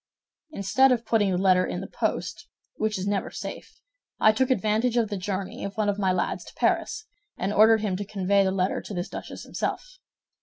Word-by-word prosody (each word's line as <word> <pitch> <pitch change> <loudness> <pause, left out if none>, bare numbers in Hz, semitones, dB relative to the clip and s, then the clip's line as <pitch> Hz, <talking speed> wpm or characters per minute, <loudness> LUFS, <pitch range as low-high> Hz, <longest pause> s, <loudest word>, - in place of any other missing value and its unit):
"Instead 265 +1 +3
of 240 -2 +1
putting 215 -4 +2
the 180 - +1
letter 185 -1 +4
in - - -3
the - - -5
post, - - -3 0.3
which 215 -1 0
is 185 - -3
never 200 -1 -1
safe, - - -8 0.4
I 215 - +6
took 250 +4 +1
advantage 225 +1 +1
of 225 -3 +2
the 205 - -2
journey 190 0 -4
of 200 +2 -5
one 215 -1 +1
of 205 0 -1
my 190 -2 +2
lads 185 - -1
to - - -13
Paris, 430 - 0 0.3
and 195 +3 -1
ordered 220 +1 +6
him 205 -4 -1
to 205 - -3
convey 200 0 +1
the 190 - +1
letter 190 0 0
to 205 - -8
this 175 0 -3
duchess - - -7
himself. - - -4
205 Hz, 205 wpm, -26 LUFS, 190-220 Hz, 0.4 s, I